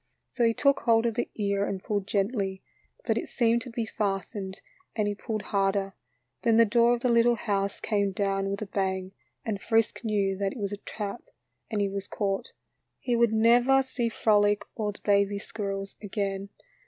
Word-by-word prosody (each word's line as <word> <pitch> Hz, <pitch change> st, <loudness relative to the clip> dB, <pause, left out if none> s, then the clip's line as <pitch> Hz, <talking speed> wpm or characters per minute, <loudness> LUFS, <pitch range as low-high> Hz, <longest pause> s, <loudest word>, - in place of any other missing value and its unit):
So 245 Hz, -, 0 dB
he 230 Hz, 0 st, +3 dB
took 280 Hz, -1 st, +3 dB
hold 230 Hz, -1 st, +3 dB
of 230 Hz, -, +1 dB
the 240 Hz, +2 st, -2 dB
ear 200 Hz, -1 st, 0 dB
and 195 Hz, -2 st, -3 dB
pulled 205 Hz, -2 st, -2 dB
gently, 195 Hz, -2 st, -1 dB, 0.4 s
but -, -, +1 dB
it -, -, -7 dB
seemed 235 Hz, -1 st, +2 dB
to 245 Hz, -, -7 dB
be 230 Hz, -1 st, -2 dB
fastened 195 Hz, -2 st, -3 dB, 0.4 s
and 215 Hz, -2 st, +1 dB
he 205 Hz, -, 0 dB
pulled 215 Hz, 0 st, -4 dB
harder, 195 Hz, 0 st, +1 dB, 0.5 s
then 225 Hz, -1 st, +3 dB
the 230 Hz, -, +7 dB
door 235 Hz, +2 st, +4 dB
of 240 Hz, -, -7 dB
the 250 Hz, -, +2 dB
little 235 Hz, 0 st, +4 dB
house 200 Hz, -3 st, -1 dB
came 200 Hz, -3 st, 0 dB
down 195 Hz, 0 st, 0 dB
with 200 Hz, +2 st, -3 dB
a -, -, -4 dB
bang, 190 Hz, -1 st, -2 dB, 0.3 s
and 205 Hz, -3 st, -2 dB
Frisk 225 Hz, 0 st, +1 dB
knew 200 Hz, -3 st, +1 dB
that 195 Hz, -1 st, 0 dB
it -, -, -10 dB
was 200 Hz, -3 st, -3 dB
a 205 Hz, -, -4 dB
trap 205 Hz, +2 st, -5 dB, 0.5 s
and 210 Hz, -2 st, -1 dB
he 200 Hz, -, +2 dB
was 195 Hz, 0 st, -5 dB
caught. 195 Hz, -2 st, -2 dB, 0.5 s
He 245 Hz, -, -1 dB
never 235 Hz, +3 st, +4 dB
would 270 Hz, 0 st, +4 dB
see 245 Hz, -3 st, -1 dB
Frolic 205 Hz, -2 st, +3 dB
or 210 Hz, -2 st, -2 dB
the 205 Hz, -, -14 dB
baby 200 Hz, 0 st, +3 dB
squirrels 195 Hz, -1 st, -5 dB
again. 200 Hz, -1 st, -3 dB
205 Hz, 190 wpm, -28 LUFS, 195-230 Hz, 0.5 s, the